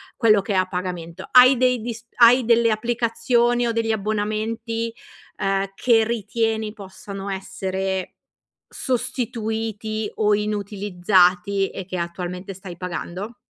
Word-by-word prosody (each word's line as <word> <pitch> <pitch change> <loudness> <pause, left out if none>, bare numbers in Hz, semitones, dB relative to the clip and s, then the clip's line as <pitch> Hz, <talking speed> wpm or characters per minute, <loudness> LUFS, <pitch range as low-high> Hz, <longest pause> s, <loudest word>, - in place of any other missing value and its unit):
quello 215 -3 +4
che 195 +1 -3
è - - 0
a 185 0 +2
pagamento. 180 -2 -5
Hai 255 +1 +8
dei 250 -2 +2
dis 230 0 -6
hai 240 +1 +6
delle 235 0 +4
applicazioni 240 +1 +1
o 230 - 0
degli 225 -1 0
abbonamenti, 220 +2 -2 0.4
ehm, 195 0 -1
che 225 -1 +3
ritieni 225 -1 -1
possano 195 -1 -9
essere 190 0 -3 0.6
sostituiti 220 -3 -3
o 210 -1 +2
inutilizzati 200 -2 +1
e 190 - -7
che, 185 -1 -5
attualmente, 180 +2 -5
stai 180 -2 -10
pagando? 180 +4 -5
215 Hz, 120 wpm, -22 LUFS, 190-230 Hz, 0.6 s, Hai